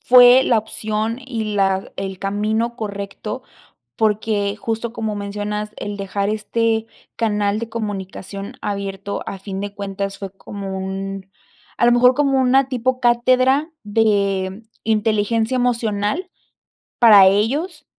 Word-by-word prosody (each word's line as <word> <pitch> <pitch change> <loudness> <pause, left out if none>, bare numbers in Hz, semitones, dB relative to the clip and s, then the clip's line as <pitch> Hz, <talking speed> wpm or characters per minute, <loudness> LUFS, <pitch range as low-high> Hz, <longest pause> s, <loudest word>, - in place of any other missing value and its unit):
fue 250 +1 +8
la 235 - +3
opción 220 +1 -2
y 225 -5 -3
la 195 -1 +1
el 190 -1 -4
camino 215 +4 -1
correcto, 210 +2 -5 0.6
porque 210 -1 +1
justo 225 +2 -3
como 220 -2 -3
mencionas, 210 +1 -4
el 205 - -4
dejar 200 0 -2
este 225 +1 0 0.3
canal 210 -2 +1
de 230 - -4
comunicación 200 -2 -5
abierto 200 -1 -4
a 195 - -6
fin 195 0 -6
de 205 0 -5
cuentas 195 0 -4
fue 195 -2 -6
como 195 0 -7
un 195 0 -5 0.5
a - - +3
lo 240 - +6
mejor 250 +1 +6
como 275 -2 +2
una 260 +1 +4
tipo 255 0 0
cátedra 255 +5 +3
de 200 -2 +1 0.2
inteligencia 220 +2 +1
emocional 235 - 0 0.7
para 210 -5 +8
ellos 285 - 0
210 Hz, 125 wpm, -20 LUFS, 200-235 Hz, 0.7 s, fue